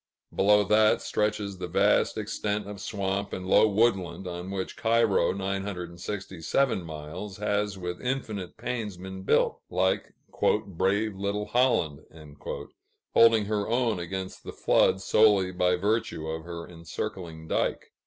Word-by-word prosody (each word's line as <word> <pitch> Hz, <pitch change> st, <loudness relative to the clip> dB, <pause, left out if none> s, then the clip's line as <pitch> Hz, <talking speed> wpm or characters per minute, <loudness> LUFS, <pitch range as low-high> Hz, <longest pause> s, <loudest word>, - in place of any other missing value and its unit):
Below 105 Hz, +1 st, +5 dB
that, 105 Hz, +2 st, +4 dB
stretches 105 Hz, -2 st, -1 dB
the 90 Hz, -, -4 dB
vast 85 Hz, -, +2 dB
extent 105 Hz, -1 st, -2 dB
of 105 Hz, -1 st, -7 dB
swamp 100 Hz, 0 st, -2 dB
and 95 Hz, -, -4 dB
low 105 Hz, +3 st, +5 dB
woodland 95 Hz, -4 st, +1 dB
on 90 Hz, +1 st, -5 dB
which 95 Hz, -1 st, -4 dB
Cairo 115 Hz, -2 st, +3 dB
(967 95 Hz, +3 st, -2 dB
miles) 85 Hz, +6 st, -7 dB
has 105 Hz, -1 st, -1 dB
with 90 Hz, -1 st, -5 dB
infinite 110 Hz, -8 st, -3 dB
pains 110 Hz, -4 st, -4 dB
been 95 Hz, +1 st, -7 dB
built 95 Hz, -, +2 dB
like 95 Hz, +1 st, 0 dB, 0.5 s
"brave 100 Hz, +3 st, 0 dB
little 100 Hz, +2 st, -2 dB
Holland," 120 Hz, -, +2 dB, 1.1 s
holding 115 Hz, -2 st, +6 dB
her 105 Hz, 0 st, -1 dB
own 115 Hz, -4 st, +1 dB
against 95 Hz, +2 st, -5 dB
the -, -, -7 dB
floods 95 Hz, -, +3 dB
solely 100 Hz, -4 st, +4 dB
by 90 Hz, 0 st, +2 dB
virtue 105 Hz, -3 st, -1 dB
of 80 Hz, 0 st, -4 dB
her 85 Hz, -1 st, -7 dB
encircling 85 Hz, -1 st, -6 dB
dike. -, -, -1 dB
95 Hz, 130 wpm, -27 LUFS, 90-105 Hz, 1.1 s, holding